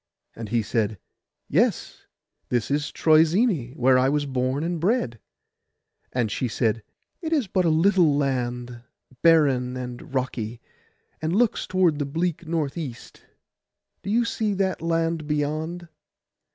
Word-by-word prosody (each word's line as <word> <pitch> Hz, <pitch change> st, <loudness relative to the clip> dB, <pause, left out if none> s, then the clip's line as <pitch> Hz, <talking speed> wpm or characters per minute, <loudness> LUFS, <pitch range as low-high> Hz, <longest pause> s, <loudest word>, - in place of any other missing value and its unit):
And 115 Hz, -2 st, -7 dB
he 115 Hz, 0 st, +1 dB
said, 110 Hz, -1 st, -1 dB, 0.5 s
'Yes; -, -, 0 dB, 0.4 s
this 120 Hz, +1 st, -1 dB
is 145 Hz, +1 st, 0 dB
Troezene, 160 Hz, -, +3 dB
where 130 Hz, -2 st, +4 dB
I 130 Hz, +1 st, +3 dB
was 145 Hz, 0 st, 0 dB
born 130 Hz, +1 st, -1 dB
and 170 Hz, 0 st, -2 dB
bred.' 170 Hz, -, 0 dB, 0.9 s
And 120 Hz, -4 st, -1 dB
she 125 Hz, -, -1 dB
said, 115 Hz, -1 st, 0 dB, 0.4 s
'It 325 Hz, -2 st, -4 dB
is 295 Hz, -7 st, +2 dB
but 185 Hz, -1 st, 0 dB
a -, -, +4 dB
little 165 Hz, -2 st, +4 dB
land, 125 Hz, -3 st, -2 dB, 0.4 s
barren 135 Hz, -6 st, +3 dB
and 125 Hz, 0 st, -7 dB
rocky, 125 Hz, -3 st, -3 dB, 0.6 s
and 160 Hz, +3 st, -1 dB
looks 230 Hz, 0 st, +1 dB
towards 180 Hz, -5 st, +2 dB
the 145 Hz, -, -1 dB
bleak 165 Hz, +2 st, -2 dB
north 160 Hz, -1 st, -2 dB
east. 135 Hz, -8 st, -8 dB, 0.8 s
Do -, -, -6 dB
you 235 Hz, +3 st, +2 dB
see 215 Hz, -3 st, -1 dB
that 190 Hz, -3 st, -1 dB
land 165 Hz, -1 st, -1 dB
beyond? 155 Hz, +4 st, -2 dB
150 Hz, 140 wpm, -24 LUFS, 125-170 Hz, 0.9 s, where